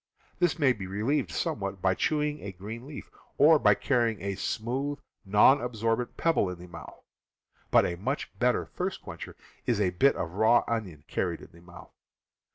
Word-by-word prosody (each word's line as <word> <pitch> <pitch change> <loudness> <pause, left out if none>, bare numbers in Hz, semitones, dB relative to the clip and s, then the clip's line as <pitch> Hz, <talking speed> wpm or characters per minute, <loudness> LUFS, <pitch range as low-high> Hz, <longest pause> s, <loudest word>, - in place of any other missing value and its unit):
This 175 -1 +2
may 140 -5 +4
be 100 -5 -7
relieved 115 +9 -1
somewhat 100 -2 -3
by 95 +1 +2
chewing 150 +6 -1
a 100 - -6
green 110 +7 -8
leaf, 150 - -9 0.3
or 155 +1 +6
by - - +5
carrying 120 -5 0
a 100 0 -3
smooth, 130 +9 -2 0.3
non 105 +8 +5
absorbent 115 0 -2
pebble 165 - +2
in 90 - -6
the 90 - -11
mouth; 85 -2 -11 0.7
but - - +5
a 85 - -2
much 95 - -3
better - - +2
thirst - - -4
quencher - - -8 0.3
is 120 -4 +1
a 95 -3 +2
bit 135 +11 +3
of 85 - -4
raw 110 +4 +4
onion 95 -11 -3
carried - - -2
in - - -13
the 85 - -17
mouth. 85 -1 -14
110 Hz, 175 wpm, -28 LUFS, 95-135 Hz, 0.7 s, or